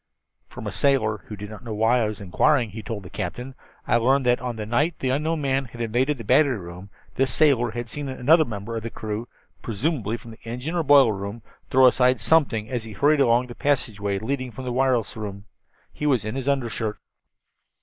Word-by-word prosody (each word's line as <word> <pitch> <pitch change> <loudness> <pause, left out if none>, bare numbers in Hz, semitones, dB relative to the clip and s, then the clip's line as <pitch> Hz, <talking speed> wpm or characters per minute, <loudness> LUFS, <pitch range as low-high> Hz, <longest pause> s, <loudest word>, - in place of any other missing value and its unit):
"From - - -9
a - - -3
sailor 110 -7 +1
who 105 - -6
did 105 +1 -8
not 105 - -10
know 115 -3 -5
why 115 +3 +3
I 110 - +1
was 105 -1 -5
inquiring," 110 +5 +2
he 110 - -7
told 105 -1 -6
the 90 - -10
captain, 125 +9 -5 0.3
"I - - +3
learned 130 +3 +2
that 125 0 +3
on 125 -2 -3
the 110 -1 -5
night 145 +9 0
the 130 - -1
unknown 155 +3 0
man 135 -2 0
invaded 120 +5 0
the 115 - -7
battery 130 +2 +3
room 90 +1 -10 0.3
this 135 0 +2
sailor 135 -6 +3
had 120 +2 -5
seen 145 +3 -5
another 145 +5 +4
member 115 -3 -6
of 115 - -3
the 115 - -5
crew, 110 +1 -5 0.3
presumably 115 - -2
from 115 -1 -12
the 110 - -15
engine 125 +8 -5
or 175 - +1
boiler 140 -6 +6
room, 100 +3 -6 0.3
throw 130 0 +5
aside 125 0 +4
something 130 -10 +2
as 120 -1 -3
he 110 - -8
hurried 145 +4 +3
along 120 -1 +3
the 120 - -9
passageway 105 -8 -1
leading 130 +4 -3
from 130 +4 -8
the 125 - -2
wireless 130 -3 +1
room. 100 -2 -7 0.5
He 150 - -3
was 130 -7 +2
in 110 - -3
his 135 0 -4
undershirt. 115 -6 -1
120 Hz, 210 wpm, -24 LUFS, 110-135 Hz, 0.5 s, boiler